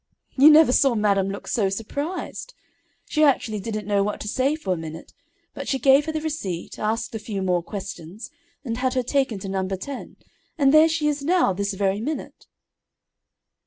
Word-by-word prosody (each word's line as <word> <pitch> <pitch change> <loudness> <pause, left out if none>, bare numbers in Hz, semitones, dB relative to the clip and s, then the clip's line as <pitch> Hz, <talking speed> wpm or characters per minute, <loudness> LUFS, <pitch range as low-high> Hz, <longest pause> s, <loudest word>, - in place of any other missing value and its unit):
"You 280 +3 +8
never 310 -3 +7
saw 265 -1 +3
madam 200 -2 +2
look 200 - -7
so 205 -5 +1
surprised. 285 - -5 0.5
She 305 - -1
actually 230 -7 +2
didn't 215 +1 -4
know 205 -1 +1
what 205 +1 -2
to - - -6
say 265 +7 +1
for 250 -12 -2
a - - -2
minute, 160 -1 -8 0.4
but - - -7
she 270 - 0
gave 275 +3 +4
her - - 0
the 310 0 -3
receipt, 205 - -5
asked 220 +2 -2
a 220 - -4
few 210 -2 -4
more 180 -2 +1
questions, 190 +1 -8 0.3
and 230 -2 -3
had 255 +1 -1
her 255 - +1
taken 265 -3 0
to 195 - -7
No. 190 -1 -2
10, 195 +8 -6 0.4
and 275 -2 +4
there 310 +1 +7
she 320 -2 0
is 295 -1 -1
now, 340 - +2
this 200 +1 -2
very 195 +1 0
minute." 300 +6 -6
225 Hz, 190 wpm, -23 LUFS, 195-285 Hz, 0.5 s, You